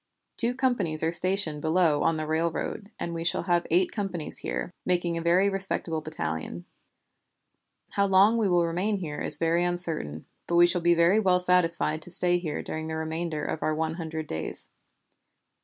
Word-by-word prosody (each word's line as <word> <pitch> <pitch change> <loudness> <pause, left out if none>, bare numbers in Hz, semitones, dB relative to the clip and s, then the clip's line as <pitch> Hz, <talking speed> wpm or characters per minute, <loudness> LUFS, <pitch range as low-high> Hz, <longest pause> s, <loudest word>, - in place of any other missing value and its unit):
Two 240 +1 0
companies 210 - 0
are 160 - +1
stationed 175 -4 +1
below 160 -1 +2
on 165 -1 +1
the 155 - -3
railroad, 165 +6 -2
and 170 - -4
we 165 0 -4
shall 170 - 0
have 175 -2 +1
eight 180 +3 +2
companies 190 -7 -3
here, 180 - -4
making 175 -2 0
a 165 - -3
very 175 +4 +3
respectable 190 -5 -1
battalion. 85 - -4 1.3
"How 200 0 +1
long 200 +4 +4
we 210 -3 +1
will 175 -1 +3
remain 185 +5 -1
here 155 -6 -5
is - - -1
very 165 +1 +1
uncertain, 165 - 0 0.2
but 170 - -1
we 175 0 +7
shall 175 0 +1
be 170 0 +4
very 170 +5 +4
well 185 -4 +3
satisfied 170 -3 +2
to 165 - -5
stay 175 0 +4
here 160 -4 -4
during 160 0 -5
the 160 - -4
remainder 160 -1 -3
of 155 - -4
our 155 - 0
one 160 0 -1
hundred 160 -2 -5
days. 80 - -4
170 Hz, 180 wpm, -27 LUFS, 160-180 Hz, 1.3 s, we